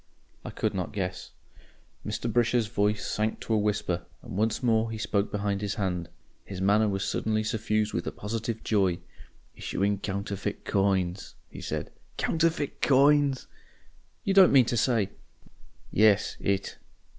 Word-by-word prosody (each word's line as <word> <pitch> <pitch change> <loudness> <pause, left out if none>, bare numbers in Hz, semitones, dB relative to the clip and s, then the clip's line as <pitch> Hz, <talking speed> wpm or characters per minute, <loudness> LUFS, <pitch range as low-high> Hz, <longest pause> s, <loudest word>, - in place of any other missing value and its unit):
I - - -6
could - - -2
not 90 -3 -3
guess. 90 -2 -4 0.7
Mr. - - -3
Brisher's 120 -1 +3
voice 105 0 0
sank 110 +1 -1
to 115 - -2
a - - +4
whisper, 105 -4 -1 0.2
and - - -8
once 110 +4 0
more 115 -1 +2
he 110 - -4
spoke 105 -2 0
behind 100 -1 -1
his 100 -1 -2
hand. 90 -4 -2 0.3
His 95 -2 -7
manner 105 +3 +3
was 95 0 -1
suddenly 110 0 0
suffused 110 -1 0
with 85 - -2
a - - -1
positive 115 +2 -4
joy. 95 -5 +2 0.6
"Issuing 100 +1 -1
counterfeit 100 0 -4
coins," 95 -2 0 0.2
he - - -9
said. - - -4 0.3
"Counterfeit 165 -3 0
coins!" 140 0 +4 0.8
"You 195 - +1
don't 190 -2 +7
mean 130 -3 +6
to 120 - -1
say 115 -4 +1 0.4
?" - - -29
"Yes 105 -1 +4
It. 100 0 -1
105 Hz, 150 wpm, -28 LUFS, 100-115 Hz, 0.8 s, don't